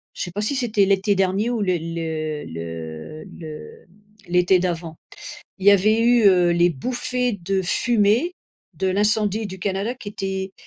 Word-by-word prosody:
je -, -, -3 dB
sais 175 Hz, -, -6 dB
pas 205 Hz, -, -3 dB
si 215 Hz, +7 st, 0 dB
c'était 220 Hz, -6 st, +2 dB
l'été 195 Hz, +1 st, +2 dB
dernier 195 Hz, +4 st, +1 dB
ou 235 Hz, -3 st, -1 dB
le 185 Hz, -3 st, +1 dB
le 160 Hz, -2 st, -4 dB
le 80 Hz, -, -7 dB, 0.2 s
le 155 Hz, 0 st, -10 dB, 0.4 s
l'été 180 Hz, +1 st, +3 dB
d'avant. 170 Hz, -2 st, -3 dB, 0.6 s
Il 190 Hz, -, -5 dB
y 205 Hz, -, +10 dB
avait 215 Hz, +3 st, +4 dB
eu, 235 Hz, -1 st, +4 dB
heu, 180 Hz, -2 st, +5 dB
les 175 Hz, +1 st, +3 dB
bouffées 250 Hz, -, -2 dB
de 195 Hz, +2 st, 0 dB
fumée 230 Hz, -, +2 dB, 0.4 s
de 190 Hz, -, -2 dB
l'incendie 210 Hz, +2 st, +1 dB
du 190 Hz, -1 st, -8 dB
Canada 195 Hz, +5 st, -2 dB
qui 235 Hz, -5 st, -9 dB
étaient 190 Hz, -1 st, -4 dB
190 Hz, 165 wpm, -22 LUFS, 170-215 Hz, 0.6 s, y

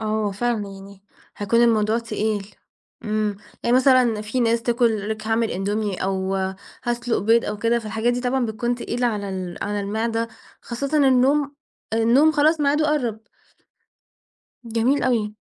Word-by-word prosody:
آه 220 Hz, -, -4 dB, 0.2 s
هو 200 Hz, -, -2 dB
فعلًا 220 Hz, 0 st, -1 dB
يعني 195 Hz, 0 st, -12 dB, 0.3 s
هيكون 230 Hz, +3 st, +2 dB
الموضوع 220 Hz, -1 st, +3 dB
تقيل، 210 Hz, -3 st, -3 dB, 0.5 s
امم، 215 Hz, -1 st, -1 dB, 0.3 s
يعني 240 Hz, +1 st, +3 dB
مثلًا 255 Hz, -4 st, +4 dB
في 225 Hz, +4 st, -2 dB
ناس 230 Hz, 0 st, +2 dB
تاكل 230 Hz, -4 st, +1 dB
لِك 215 Hz, 0 st, -4 dB
هاعمل 225 Hz, 0 st, +1 dB
إندومي 205 Hz, +1 st, -2 dB
أو 190 Hz, 0 st, -1 dB, 0.5 s
هاسلُق 240 Hz, 0 st, -1 dB
بيض 230 Hz, +3 st, +3 dB
أو 210 Hz, -, -3 dB
كده، 230 Hz, +2 st, +2 dB
فالحاجات 220 Hz, +2 st, -1 dB
دي 245 Hz, -, -2 dB
طبعًا 250 Hz, 0 st, 0 dB
بتكون 235 Hz, +2 st, -1 dB
تقيلة 245 Hz, 0 st, -2 dB
على 205 Hz, -3 st, -2 dB
ال 185 Hz, -2 st, -5 dB
على 205 Hz, 0 st, -2 dB
المعدة، 225 Hz, +3 st, -2 dB, 0.3 s
خاصةً 280 Hz, +5 st, -2 dB
النوم، 275 Hz, +3 st, +3 dB, 0.4 s
النوم 240 Hz, +8 st, +4 dB
خلاص 310 Hz, +1 st, +3 dB
ميعادُه 295 Hz, +2 st, +2 dB
قرَّب. 235 Hz, -7 st, -1 dB, 1.4 s
جميل 235 Hz, +4 st, +1 dB
أوي. 220 Hz, -4 st, 0 dB
230 Hz, 145 wpm, -22 LUFS, 210-245 Hz, 1.4 s, مثلًا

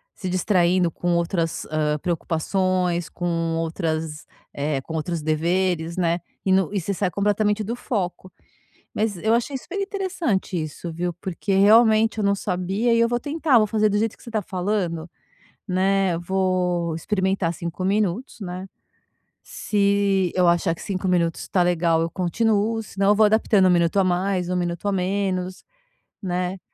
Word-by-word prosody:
se 185 Hz, -, -5 dB
distraindo 180 Hz, -1 st, +2 dB
com 175 Hz, +1 st, -2 dB
outras, 170 Hz, -1 st, -1 dB
hã, 150 Hz, -1 st, 0 dB
preocupações, 175 Hz, +1 st, -1 dB
com 165 Hz, -2 st, -2 dB
outras, 160 Hz, -2 st, -3 dB, 0.3 s
eh, 145 Hz, 0 st, -1 dB
com 160 Hz, -, -9 dB
outros 160 Hz, +1 st, -2 dB
deveres, 170 Hz, +2 st, 0 dB
né, 170 Hz, -1 st, +1 dB, 0.3 s
e 190 Hz, -, +2 dB
no 190 Hz, 0 st, +2 dB
e 200 Hz, -, +1 dB
você 195 Hz, +3 st, -2 dB
sai 190 Hz, -1 st, -1 dB
completamente 205 Hz, +2 st, +1 dB
do 230 Hz, +4 st, -3 dB
foco. 185 Hz, -7 st, -4 dB, 0.6 s
Mas, 210 Hz, -2 st, -1 dB
eu 220 Hz, +6 st, +1 dB
achei 240 Hz, +4 st, 0 dB
super 365 Hz, +9 st, -6 dB
interessante 370 Hz, -, -2 dB
isso, 155 Hz, +2 st, -6 dB
viu, 175 Hz, +1 st, -2 dB
porque, 190 Hz, +3 st, -3 dB
realmente, 220 Hz, +2 st, +5 dB
eu -, -, 0 dB
não 200 Hz, 0 st, +3 dB
sabia 195 Hz, +5 st, 0 dB
e 230 Hz, -, +3 dB
eu 230 Hz, 0 st, +3 dB
vou 240 Hz, 0 st, 0 dB
tentar, 290 Hz, 0 st, +2 dB
vou 215 Hz, -, +4 dB
fazer 215 Hz, 0 st, +2 dB
do 205 Hz, -, +1 dB
jeito 220 Hz, +1 st, 0 dB
que -, -, -23 dB
você -, -, -9 dB
tá 220 Hz, -2 st, -1 dB
falando, 180 Hz, -3 st, -2 dB, 0.6 s
né, 190 Hz, -1 st, +1 dB
vou 180 Hz, -2 st, 0 dB
experimentar 190 Hz, 0 st, 0 dB
5 170 Hz, +2 st, -5 dB
minutos, 205 Hz, +5 st, -1 dB
né. 185 Hz, -1 st, -6 dB, 0.8 s
Se 200 Hz, -2 st, +1 dB
eu 180 Hz, -1 st, +3 dB
achar 170 Hz, 0 st, +2 dB
que -, -, -12 dB
5 190 Hz, -1 st, -3 dB
minutos 170 Hz, -2 st, 0 dB
tá 180 Hz, -, +2 dB
legal, 170 Hz, -2 st, +2 dB
eu 165 Hz, -, -2 dB
continuo, 220 Hz, +4 st, 0 dB
senão 195 Hz, -1 st, -1 dB
eu 205 Hz, -, +6 dB
vou 215 Hz, +1 st, +4 dB
adaptando 210 Hz, -2 st, +4 dB
1 185 Hz, -, +5 dB
minuto 170 Hz, 0 st, +2 dB
a 195 Hz, -, +4 dB
mais, 180 Hz, 0 st, 0 dB
1 180 Hz, -, 0 dB
minuto 175 Hz, +1 st, -2 dB
a 200 Hz, -, +1 dB
menos, 185 Hz, -1 st, -2 dB, 0.6 s
né, 180 Hz, 0 st, -2 dB
185 Hz, 165 wpm, -23 LUFS, 170-205 Hz, 0.8 s, eu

